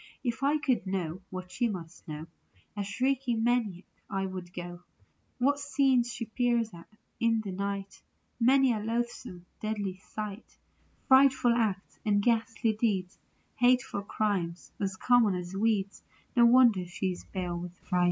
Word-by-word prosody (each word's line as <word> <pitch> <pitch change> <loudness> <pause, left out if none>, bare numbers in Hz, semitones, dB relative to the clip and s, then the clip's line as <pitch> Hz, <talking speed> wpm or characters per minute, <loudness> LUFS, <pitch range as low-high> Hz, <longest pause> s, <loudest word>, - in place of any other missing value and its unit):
If 240 -1 -2
I 285 +2 +3
could 260 -9 0
know 185 -2 -2
what 185 -1 -7
she 240 - 0
must 175 -3 -8
know 155 0 -6 0.5
A 205 - -2
shrieking 245 +2 0
maniac 225 -7 +1 0.3
I 195 -1 -1
would 185 -2 -6
go. 175 -1 -7 0.6
What 280 +3 +2
scenes 270 -4 +2
she 230 - -4
peers 235 -2 0
at 170 -1 -12 0.3
in 230 -1 +2
the 200 -3 -5
night! 200 +1 -4 0.4
Many 260 +1 +5
a 220 - -2
loathsome, 230 -4 -3
deadly 205 -3 -3
sight; 210 +2 -7 0.5
Frightful 265 -2 +6
acts 215 -5 -1
and 205 -1 +3
ghastly 225 0 +1
deeds; 200 -4 -1 0.4
Hateful 245 -3 +3
crimes 195 -4 -2
as 195 -1 -1
common 235 -5 +4
as 180 +1 -5
weeds; 200 -2 0 0.3
No 235 -1 +7
wonder 235 -7 +5
she 185 +2 -2
is 180 - -7
pale 180 -2 -3
with 180 0 -8
fright. 180 -2 -2
210 Hz, 150 wpm, -29 LUFS, 185-240 Hz, 0.6 s, No